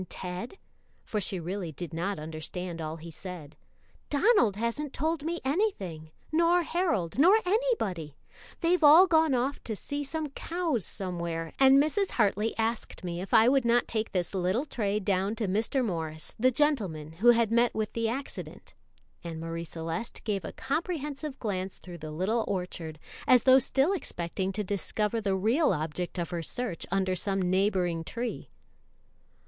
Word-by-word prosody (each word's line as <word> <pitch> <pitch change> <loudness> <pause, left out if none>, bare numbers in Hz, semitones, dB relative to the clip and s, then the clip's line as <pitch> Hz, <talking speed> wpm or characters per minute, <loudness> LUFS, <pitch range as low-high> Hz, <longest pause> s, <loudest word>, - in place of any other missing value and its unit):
Ted?" 185 - -6 0.5
for 210 - -2
she 190 -1 -2
really 175 0 -4
did 165 +2 -7
not 185 +5 -2
understand 160 +3 -5
all 155 0 -4
he 165 +1 -9
said. 165 -3 -8 0.5
"Donald 290 - +4
hasn't 235 +7 -2
told 315 +1 -1
me 340 +2 -2
anything, 230 - -1 0.2
nor 340 +2 +4
Harold, 320 - -1
nor 365 +8 +7
anybody. 360 - 0 0.4
They've 345 0 +2
all 310 +5 +9
gone 320 -5 +3
off 260 +3 -1
to 220 - -3
see 285 - -4
some 310 +1 -3
cows 325 - -2
somewhere, 170 -3 -3
and 270 0 +7
Mrs. 310 +8 +2
Hartley 210 0 +1
asked 225 -2 -2
me 175 -1 -3
if 195 - -7
I 225 -1 +6
would 270 0 +4
not 235 +1 +3
take 220 -1 -2
this 180 -2 -1
little 190 +8 0
tray 210 -7 -1
down 195 +1 0
to 225 -3 -2
Mr. 225 +7 +1
Morris, 160 -5 -3
the 255 +3 +5
gentleman 215 - 0
who 220 +7 +1
had 230 -2 +4
met 235 +1 +3
with 215 -1 -2
the 230 -1 0
accident," 270 +4 -6 0.5
and 165 -2 -5
Marie 165 +1 -4
Celeste 165 +7 -5
gave 200 -4 -1
a - - -5
comprehensive 295 -1 -3
glance 190 -4 -3
through 175 -2 -10
the 155 0 -7
little 190 +9 0
orchard, 180 -4 -4 0.3
as 250 -2 +6
though 260 0 +7
still 270 +7 +2
expecting 190 - -3
to 210 +2 -2
discover 210 +3 -1
the 195 -2 +1
real 230 - +3
object 165 +3 -3
of 170 -2 -3
her 170 -1 -2
search 195 +1 -4
under 190 0 +1
some 195 +2 -1
neighboring 185 -2 +1
tree. 235 +8 -4
210 Hz, 165 wpm, -29 LUFS, 175-275 Hz, 0.5 s, all